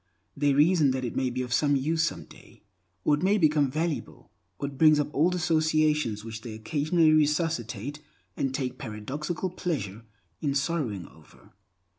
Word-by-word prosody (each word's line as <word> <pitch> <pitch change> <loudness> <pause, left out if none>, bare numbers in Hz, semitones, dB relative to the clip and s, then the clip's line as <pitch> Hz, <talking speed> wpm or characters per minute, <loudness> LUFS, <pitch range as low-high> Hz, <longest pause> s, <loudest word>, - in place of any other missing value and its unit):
They 145 -1 +2
reason 155 0 +4
that 130 - -3
it 120 - -5
may 130 -1 0
be 125 +1 -3
of 125 -1 -4
some 145 +2 +3
use 155 +4 0
someday; 165 - -6 0.4
or - - +3
it 145 - +1
may 200 +3 +3
become 150 -5 +3
valuable; 155 +2 -4 0.3
or 140 - -3
it 140 - -8
brings 155 +1 +5
up 150 0 -2
old 170 +5 +2
associations 155 -9 +1
which 110 -1 -7
they 110 -1 -7
occasionally 155 +7 +2
resuscitate 150 - 0 0.4
and 135 - -1
take 130 -2 -2
a - - -20
paradoxical 145 - -4
pleasure 130 - -3 0.4
in 140 -2 0
sorrowing 140 - -1
over. 80 +1 -20
145 Hz, 165 wpm, -27 LUFS, 125-160 Hz, 0.4 s, brings